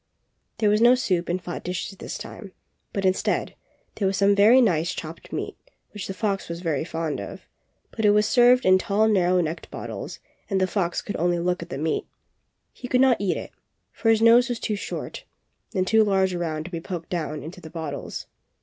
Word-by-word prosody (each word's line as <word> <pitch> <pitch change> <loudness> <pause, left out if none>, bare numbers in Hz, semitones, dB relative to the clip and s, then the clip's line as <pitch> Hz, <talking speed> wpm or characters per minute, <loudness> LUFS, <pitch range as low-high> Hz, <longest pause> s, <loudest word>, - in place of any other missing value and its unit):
There 215 -2 +2
was 210 +1 +2
no 240 +2 +7
soup 180 -9 -1
in 175 - +1
flat 175 -1 -7
dishes 180 +2 -4
this - - -5
time, 200 -4 -9 0.4
but, 195 -1 -2
instead, 185 0 +1 0.4
there 200 - 0
was 190 0 0
some 200 0 +4
very 210 +6 +6
nice 175 -8 +2
chopped 160 +1 -8
meat - - -4 0.4
which 210 -2 -6
the 195 - -4
fox 200 -2 -2
was 170 +1 -5
very 160 -5 -1
fond 165 -2 -3
of, - - -9 0.2
— - - -46
but 220 - -2
it 210 - +6
was 210 +1 +4
served 250 +2 +5
in 185 0 +6
tall 210 +3 +2
narrow 185 -4 +3
necked 165 +1 -4
bottles - - -6 0.3
and 195 -2 +1
the 185 - +3
fox 185 -2 -1
could 205 - -4
only 175 +1 +1
look 180 +1 -1
at 170 - -8
the 135 - -4
meat. 155 +2 -1 0.7
He 250 - -8
could 250 - +2
not 260 -2 +5
eat 195 -3 0
it, - - -7 0.4
for 225 - -1
his 225 0 +4
nose 240 +2 +6
was 240 -2 -2
too 215 - -2
short 200 - -6 0.5
and 185 -1 +2
too 220 +3 +4
large 190 -2 +2
around 160 -3 -2
to 175 - -9
be 170 -2 -4
poked 170 -2 -6
down 155 -3 -3
into 170 +4 -9
the 160 - -10
bottles. 160 -4 -5
185 Hz, 215 wpm, -24 LUFS, 170-215 Hz, 0.7 s, no